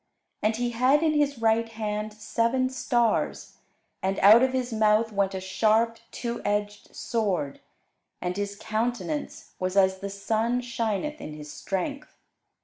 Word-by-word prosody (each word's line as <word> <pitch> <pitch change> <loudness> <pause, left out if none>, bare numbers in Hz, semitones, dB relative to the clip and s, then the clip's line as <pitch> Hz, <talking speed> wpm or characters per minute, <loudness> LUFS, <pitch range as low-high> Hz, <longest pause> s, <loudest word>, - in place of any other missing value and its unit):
And 215 +1 +1
he 240 +1 -1
had 255 +6 +3
in 315 -1 +3
his 290 -2 +1
right 225 0 +2
hand 215 -1 -3
seven 235 +4 0
stars: 240 -3 0 0.4
and 190 0 -1
out 215 +4 +8
of 260 0 +3
his 255 -2 -2
mouth 215 +1 +3
went 195 -2 0
a - - -2
sharp 220 +4 +1
two 235 -1 -4
edged 205 0 -2
sword: 190 - -1 0.6
and 180 0 -3
his 200 0 -3
countenance 215 -8 -3
was 185 +1 -1
as 190 -1 +4
the 200 +1 -5
sun 220 +5 0
shineth 235 +5 -2
in 155 - -7
his 150 -1 -9
strength. 275 +10 -4
220 Hz, 145 wpm, -26 LUFS, 200-240 Hz, 0.6 s, out